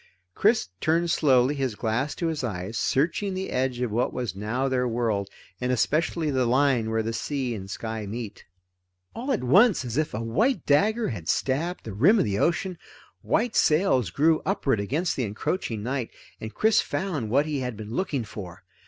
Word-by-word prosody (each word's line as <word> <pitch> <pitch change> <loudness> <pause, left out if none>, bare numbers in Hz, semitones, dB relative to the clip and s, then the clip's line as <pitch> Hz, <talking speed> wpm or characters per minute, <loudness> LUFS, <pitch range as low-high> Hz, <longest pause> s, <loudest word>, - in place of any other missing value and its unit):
Chris 220 - +2
turned 165 +2 +1
slowly, 130 -3 +3
his 135 -6 -2
glass 115 +7 -1
to 170 - -3
his 160 -4 -2
eyes, 100 -2 -4
searching 175 - 0
the 190 +1 -4
edge 125 -1 -1
of 125 -3 -1
what 120 +4 0
was 120 -8 -4
now 110 +7 -1
their 125 -1 +1
world, 115 -4 -1 0.3
and 125 - 0
especially 155 +5 +1
the 130 -2 +1
line 130 -3 +2
where 110 0 0
the 115 +1 -3
sea 130 +1 -2
and 95 -3 -7
sky 110 0 -5
meet. 110 0 -6 0.7
All 255 +4 -3
at 240 - 0
once, 190 - +4
as 120 +1 -4
if 155 -7 0
a - - -2
white 190 - +1
dagger 215 +11 +2
had 90 -8 -6
stabbed 160 +7 -1
the 110 - -7
rim 160 - +5
of - - +2
the 100 -1 -1
ocean, 175 - 0 0.4
white 240 -2 0
sails 150 - +3
grew 155 - +2
upward 140 - 0
against 150 - -1
the 130 - -1
encroaching 110 - -3
night, 130 0 -2 0.3
and 110 - -6
Chris 220 0 +4
found 155 - -3
what 140 +6 +3
he 150 -2 -2
had 125 -4 -4
been 110 0 -8
looking 145 -5 -1
for. 95 -5 -9
130 Hz, 190 wpm, -26 LUFS, 110-165 Hz, 0.7 s, rim